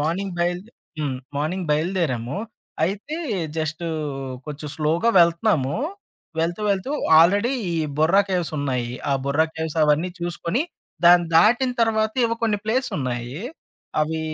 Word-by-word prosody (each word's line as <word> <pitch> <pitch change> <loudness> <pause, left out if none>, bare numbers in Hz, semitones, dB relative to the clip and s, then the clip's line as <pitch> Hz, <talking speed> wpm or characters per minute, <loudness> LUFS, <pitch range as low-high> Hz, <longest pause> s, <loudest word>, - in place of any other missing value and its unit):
Morning 175 +5 -1
బయల్దే 175 +5 -1 0.3
హ్మ్. 140 -4 -1 0.2
Morning 170 +5 -2
బయలుదేరాము. 150 -5 0 0.5
అయితే 210 - -3 0.4
జస్టూ 160 +2 -2 0.6
కొంచెం 150 0 -6
స్లోగా 165 +9 +2
వెళ్తున్నాము. 170 -5 +2 0.6
వెళ్తూ, 170 +4 -1
వెళ్తూ 200 +7 -1 0.3
ఆల్రెడీ 205 +9 +4 0.2
ఈ - - -1 0.2
బుర్రాకేవ్స్ 180 +1 +2
ఉన్నాయి. 125 -4 -1 0.2
ఆ - - +3
బుర్రా 150 +4 +2
కేవ్స్ 160 0 -4
అవన్నీ 155 +4 +2
చూసుకొని 175 - -1 0.4
దాన్ని 175 0 +7
దాటిన 245 +8 +5
తర్వాత 220 -1 +1
ఎవో 230 - -1
కొన్ని 215 -3 +2
ప్లేస్ 250 +4 0
ఉన్నాయి. 125 +1 -3 0.6
అవి 160 +1 -2
170 Hz, 120 wpm, -23 LUFS, 150-200 Hz, 0.6 s, దాన్ని